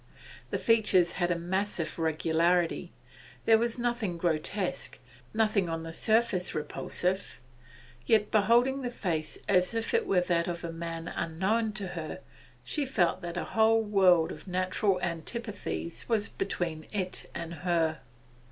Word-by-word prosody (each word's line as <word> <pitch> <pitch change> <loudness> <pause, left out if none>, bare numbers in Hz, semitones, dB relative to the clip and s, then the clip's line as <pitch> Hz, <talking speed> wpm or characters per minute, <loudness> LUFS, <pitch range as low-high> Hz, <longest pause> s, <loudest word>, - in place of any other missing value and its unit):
The - - -1
features 210 -6 +3
had 175 -1 -1
a 175 - +1
massive 180 -1 -2
regularity; 165 +2 +1 0.5
there 225 -1 +6
was 235 +1 -1
nothing 235 -7 -1
grotesque, 175 +3 -2 0.3
nothing 215 -5 +1
on 165 0 -3
the 165 0 -7
surface 220 -3 +1
repulsive; 180 +5 -1 0.7
yet, 215 -2 +3
beholding 240 +6 +3
the 250 - -2
face 170 -10 -2
as 185 +2 +3
if 225 0 -1
it 460 -2 +2
were 180 - +3
that 170 -1 +1
of 170 -1 -4
a 170 - -3
man 165 0 -5
unknown 195 +8 -1
to 195 -2 -3
her, 165 -3 -6 0.4
she 300 - -1
felt 190 -11 +1
that 175 0 -5
a - - -1
whole 225 0 +4
world 185 -6 +4
of 150 - -10
natural 185 +1 +1
antipathies 165 - -3
was 215 -3 +1
between 165 -5 -3
it 185 -3 -2
and 170 0 -5
her. 165 -4 +1
180 Hz, 145 wpm, -29 LUFS, 170-215 Hz, 0.7 s, there